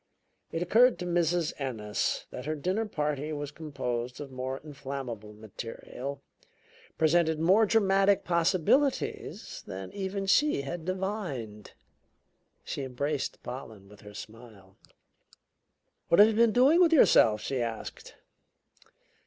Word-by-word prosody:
It 165 +1 -1
occurred 235 +7 +5
to 180 - -5
Mrs. 175 -1 +1
Ennis 110 -6 -2
that 125 - -7
her 155 - -1
dinner 185 +9 -1
party 150 -4 -2
was 145 -1 -4
composed 125 -6 -4
of 145 -2 -7
more 130 +1 -4
inflammable 135 -7 -7
material, 115 +5 -8 0.7
presented 160 0 +3
more 195 +7 +4
dramatic 195 -2 +3
possibilities, 180 - 0
than 95 0 -7
even 195 0 -3
she 285 - +3
had 160 +4 -6
divined. 180 - -4 0.9
She - - -5
embraced 135 +2 -3
Pollen 110 -6 -8
with 105 0 -16
her 105 -1 -12
smile. 110 -4 -12 1.3
"What 170 - +3
have 210 +2 +8
you - - 0
been 230 +1 +4
doing 270 +9 +5
with 335 -2 +5
yourself?" 110 - +5
she 130 -2 -2
asked. 115 -1 -6
150 Hz, 120 wpm, -29 LUFS, 125-190 Hz, 1.3 s, have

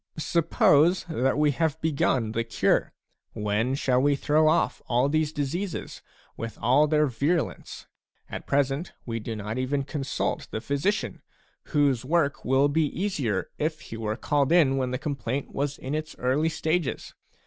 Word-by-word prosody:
Suppose 165 +1 +3
that 135 -4 +1
we 150 -1 +3
have 155 +1 -1
begun 135 -7 +1
the 115 +1 -1
cure; 110 -2 +1 0.4
when 105 +5 0
shall 130 -2 +2
we 145 +1 +3
throw 150 +3 +2
off 155 - +2
all 125 +3 +2
these 155 +1 +1
diseases, 160 +6 -4 0.3
with 115 0 -6
all 130 +7 +4
their 150 0 +3
viru 145 +6 +1
lence? - - -11 0.4
At - - -7
present, 140 +4 0
we 115 -1 -3
do 115 +1 -5
not 105 +3 -4
even 135 +2 0
consult 140 -1 -3
the - - -3
physician, 140 - -1 0.4
whose 140 -6 +2
work 145 0 +1
would 135 +2 +3
be 160 -1 +3
easier 145 - -2
if 155 +1 -1
he 115 - -8
were 110 -1 -2
called 145 +1 +1
in 150 -6 +4
when 130 -1 0
the 130 - -2
complaint 140 -2 -3
was 140 0 -2
in 130 +2 -5
its 155 0 -4
early 135 +6 +1
stages. 160 -1 -2
140 Hz, 160 wpm, -26 LUFS, 125-155 Hz, 0.4 s, all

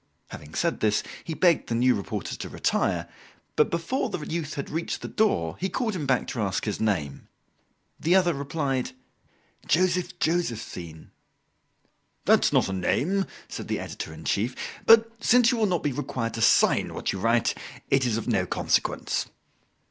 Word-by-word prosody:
Having 75 +1 -10
said 170 -1 0
this, 105 -1 +2 0.2
he 160 - -5
begged 175 -1 +3
the 115 - 0
new 125 +2 +4
reporter 100 - -4
to - - -7
retire, - - 0 0.5
but 150 - +3
before 170 +10 -1
the - - -3
youth 160 -2 -3
had 140 - -5
reached 165 +2 -3
the - - -3
door 85 - 0
he 190 - -1
called 225 -2 -1
him 150 -6 -3
back 130 -2 +2
to 120 - -3
ask 100 -2 -1
his 105 - -2
name. 85 -11 -1 0.7
The 170 +3 +3
other 180 -2 +4
replied: 140 -2 -2 0.7
"Joseph 180 +1 +1
Josephine." 115 - -3 1.1
"That's - - +4
not - - +3
a 95 - -3
name," 180 - 0 0.2
said - - -7
the - - -1
editor - - -6
in 80 0 -11
chief, 115 +6 0 0.3
"but 225 0 +7
since 245 +1 +5
you 245 - 0
will 215 - +3
not 175 -4 0
be 145 - +1
required 120 -4 -3
to 115 - -4
sign - - +4
what - - -2
you 95 - -4
write 115 +2 +2 0.4
it 135 -1 +4
is 120 -3 +1
of 115 - -4
no 100 -6 +1
consequence." - - 0
140 Hz, 170 wpm, -26 LUFS, 110-175 Hz, 1.1 s, but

